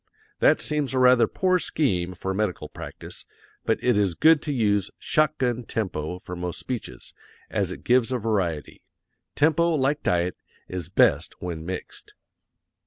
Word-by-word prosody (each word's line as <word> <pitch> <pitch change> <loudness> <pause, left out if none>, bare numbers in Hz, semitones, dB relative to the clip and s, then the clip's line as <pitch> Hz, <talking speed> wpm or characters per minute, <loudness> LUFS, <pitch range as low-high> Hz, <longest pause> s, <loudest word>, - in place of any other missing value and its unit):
That - - +5
seems 150 -3 -1
a - - +1
rather 125 -2 +5
poor 185 - +1
scheme 95 - 0
for 95 +2 -3
medical 95 -6 -2
practice, - - -9 0.4
but - - +2
it 125 - +3
is 100 -4 +1
good 160 -1 +5
to 150 - -3
use 105 -7 +1
"shot 155 0 +1
gun" 125 -2 -1
tempo 90 -8 -3
for 90 0 -8
most 90 0 -4
speeches, 110 - -6 0.4
as - - 0
it - - -8
gives 125 0 +3
a 130 - +1
variety. 95 -10 -2 0.5
Tempo, 160 +3 +3
like 145 +1 +1
diet, 90 0 0 0.3
is 90 -3 -5
best 95 - +2
when 85 -2 -5
mixed. 95 0 -7
110 Hz, 155 wpm, -25 LUFS, 90-135 Hz, 0.5 s, That